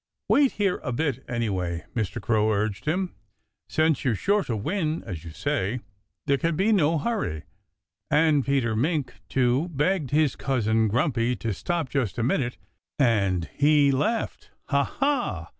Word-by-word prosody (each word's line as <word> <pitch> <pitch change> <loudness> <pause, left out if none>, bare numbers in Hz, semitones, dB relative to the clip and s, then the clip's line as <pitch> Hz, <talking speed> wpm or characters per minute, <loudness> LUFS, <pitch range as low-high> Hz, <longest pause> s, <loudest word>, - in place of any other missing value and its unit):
"Wait 280 -2 +4
here 200 -3 0
a 130 - -3
bit, 140 +3 -1
anyhow!" 95 -8 -1 0.2
Mr. 110 -5 -2
Crow 110 -2 +2
urged 105 0 -1
him. 180 +4 -1 0.6
"Since 155 -3 +2
you're 125 -5 +1
sure 200 - +1
to 115 - -2
win 160 - -1
as 90 -8 -7
you 85 - -8
say 95 +8 -2 0.4
there 140 -1 +2
can 165 +3 0
be 195 +7 +2
no 165 -5 +3
hurry." 150 - -2 0.7
And 150 -2 +4
Peter 130 -5 +1
Mink 145 +1 0 0.2
too 130 +6 +1
begged 155 0 0
his 150 -2 +2
cousin 110 -4 +1
Grumpy 125 +1 +1
to 115 -2 -3
stop 170 - -2
just 125 -6 -2
a 115 - 0
minute. 125 0 0 0.4
And 100 - +2
he 145 -1 +4
laughed, 215 - -1 0.2
"Ha, 140 -1 +3
ha!" 285 +1 -1
135 Hz, 155 wpm, -25 LUFS, 110-160 Hz, 0.7 s, Wait